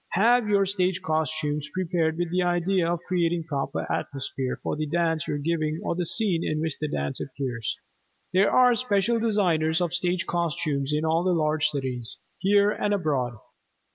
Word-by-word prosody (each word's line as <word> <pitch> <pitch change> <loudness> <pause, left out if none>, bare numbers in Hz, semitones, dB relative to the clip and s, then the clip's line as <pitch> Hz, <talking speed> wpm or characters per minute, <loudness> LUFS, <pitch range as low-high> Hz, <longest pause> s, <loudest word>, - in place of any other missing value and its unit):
Have 230 +3 +4
your 200 -1 +4
stage 185 -2 0
costumes 155 -2 -1
prepared 165 -3 0
with 175 -1 -2
the 180 +1 +1
idea 175 0 +1
of 175 -1 -2
creating 175 -2 +1
proper 140 -4 -3
atmosphere 130 -1 -3
for - - -1
the 155 0 -2
dance 165 -1 0
you - - -1
are - - -1
giving 155 +1 -1
or - - 0
the 175 0 -2
scene 190 -6 +1
in 155 - -1
which 160 -2 -2
the 150 - -1
dance 70 - -3
appears. 130 -4 -4 0.6
There 190 +2 +4
are 250 -1 +6
special 230 -1 +1
designers 175 -8 +2
of 175 -2 -1
stage 175 0 0
costumes 150 -5 -1
in 150 +1 0
all 165 +2 +2
the 185 0 +2
large 155 -2 +2
cities, 130 -5 -4 0.2
here 200 +1 +4
and 205 -1 0
abroad. 140 -9 -1
165 Hz, 175 wpm, -26 LUFS, 150-185 Hz, 0.6 s, are